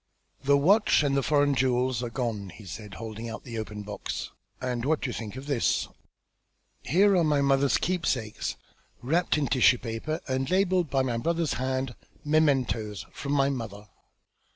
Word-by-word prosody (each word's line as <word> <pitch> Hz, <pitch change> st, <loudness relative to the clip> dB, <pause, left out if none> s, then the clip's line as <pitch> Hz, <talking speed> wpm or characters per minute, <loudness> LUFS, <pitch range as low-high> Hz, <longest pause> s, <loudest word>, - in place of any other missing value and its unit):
"The 140 Hz, +1 st, +5 dB
watch 195 Hz, +4 st, +4 dB
and 140 Hz, -1 st, +1 dB
the 140 Hz, -, +3 dB
foreign 145 Hz, 0 st, +3 dB
jewels 130 Hz, -2 st, +1 dB
are 120 Hz, -, -3 dB
gone," 115 Hz, -5 st, -3 dB
he 105 Hz, -, -12 dB
said, 105 Hz, +1 st, -8 dB
holding 110 Hz, +1 st, -6 dB
out 110 Hz, -, -7 dB
the 115 Hz, -4 st, -5 dB
open 105 Hz, -1 st, -6 dB
box. 105 Hz, 0 st, -5 dB, 0.3 s
"And 125 Hz, -2 st, -2 dB
what 150 Hz, +3 st, +1 dB
do 125 Hz, -, -2 dB
you -, -, -6 dB
think 110 Hz, 0 st, -6 dB
of 130 Hz, +1 st, -7 dB
this? 140 Hz, -5 st, +1 dB, 0.9 s
Here 195 Hz, -, +4 dB
are 175 Hz, -, +4 dB
my 150 Hz, -2 st, +2 dB
mother's 140 Hz, 0 st, +3 dB
keepsakes, 140 Hz, -12 st, -1 dB, 0.5 s
wrapped 165 Hz, +5 st, +1 dB
in 150 Hz, -, +1 dB
tissue 130 Hz, -1 st, +4 dB
paper, 120 Hz, +8 st, -4 dB
and 130 Hz, 0 st, -1 dB
labelled 185 Hz, -2 st, +2 dB
in 135 Hz, -1 st, +2 dB
my 120 Hz, -2 st, -1 dB
brother's 165 Hz, +3 st, 0 dB
hand, 130 Hz, 0 st, -2 dB, 0.3 s
'Mementos. 135 Hz, -9 st, +1 dB
From 140 Hz, 0 st, -4 dB
my 140 Hz, -1 st, +3 dB
mother.' 105 Hz, -5 st, -6 dB
130 Hz, 170 wpm, -27 LUFS, 115-150 Hz, 0.9 s, The